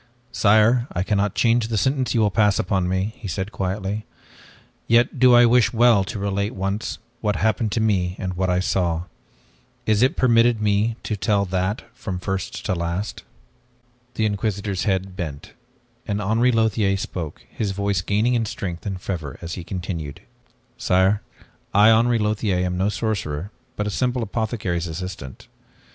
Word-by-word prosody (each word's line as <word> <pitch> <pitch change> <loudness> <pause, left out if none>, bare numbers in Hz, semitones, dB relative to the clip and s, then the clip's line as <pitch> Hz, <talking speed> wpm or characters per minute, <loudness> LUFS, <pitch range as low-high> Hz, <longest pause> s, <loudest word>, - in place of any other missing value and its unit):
"Sire, 110 +4 +4
I 85 - 0
cannot 100 0 0
change 115 -1 +2
the 115 -1 -1
sentence 130 +3 +1
you 115 - +3
will 105 -1 +3
pass 105 -1 +3
upon 95 -3 0
me," 95 +4 -1
he 115 -5 -7
said 95 +4 -3
quietly, 100 +2 -3 0.8
"yet 120 +3 +3
do 125 -1 +7
I 120 0 +7
wish 120 -1 +4
well 115 -3 +5
to 105 - -5
relate 100 +1 -2
once, 100 +3 -3 0.2
what 105 -3 0
happened 110 +1 0
to - - 0
me 95 -5 +1
and 95 -1 -3
what 95 +1 -1
I 90 0 +2
saw. 85 -3 0 0.8
Is 110 -1 +2
it 130 - +3
permitted 120 -2 +4
me 105 +2 +1
to 105 - -2
tell 100 0 +1
that 95 +3 -1
from 95 -3 -5
first 95 -1 -4
to - - 0
last?" 85 +4 -3 0.9
The 110 - +1
Inquisitor's 100 -2 -2
head 95 -2 -1
bent, 85 +3 -6 0.5
and 105 -1 -1
Henri 110 +5 +2
Lothiere 110 -4 +2
spoke, 85 -5 -6
his 105 - -3
voice 100 -1 -1
gaining 105 +7 +1
in 115 -2 +1
strength 90 -3 -5
and 95 -2 -3
fervor 80 -7 -5
as 85 0 -6
he 90 - -6
continued. 85 -5 -5 0.6
"Sire, 95 +3 +3 0.5
I, 105 +2 +7
Henri 115 +2 +4
Lothiere, 105 -4 0
am 90 0 -2
no 95 +3 +1
sorcerer 100 -6 -3 0.2
but 105 - -2
a 105 - -2
simple 125 +2 0
apothecary's 105 -5 -2
assistant. 80 -6 -7
100 Hz, 165 wpm, -22 LUFS, 95-110 Hz, 0.9 s, do